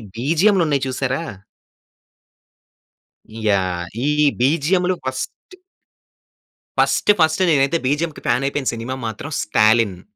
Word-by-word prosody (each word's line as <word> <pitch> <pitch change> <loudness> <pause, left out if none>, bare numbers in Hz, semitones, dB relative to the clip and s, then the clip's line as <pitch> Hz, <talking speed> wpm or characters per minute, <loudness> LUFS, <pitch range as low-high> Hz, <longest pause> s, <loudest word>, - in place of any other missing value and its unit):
బీజీఎమ్‌లున్నయి 160 - +2
చూసారా? 130 +2 -2 2.2
యాహ్! 95 -4 0 0.2
ఈ - - +1 0.3
బీజీఎమ్‌లు 170 +7 +1
first 130 - -6 1.2
first, - - +3
first 160 +3 +2
నేనైతే 140 +1 +2
బీజీఎమ్‌కి 150 +3 -1
ఫ్యాన్ 125 +3 +1
అయిపోయిన 140 -2 -2
సినిమా 115 +3 -5
మాత్రం 110 +7 -6
'స్టాలిన్.' 105 -3 +2
135 Hz, 90 wpm, -20 LUFS, 115-160 Hz, 2.2 s, first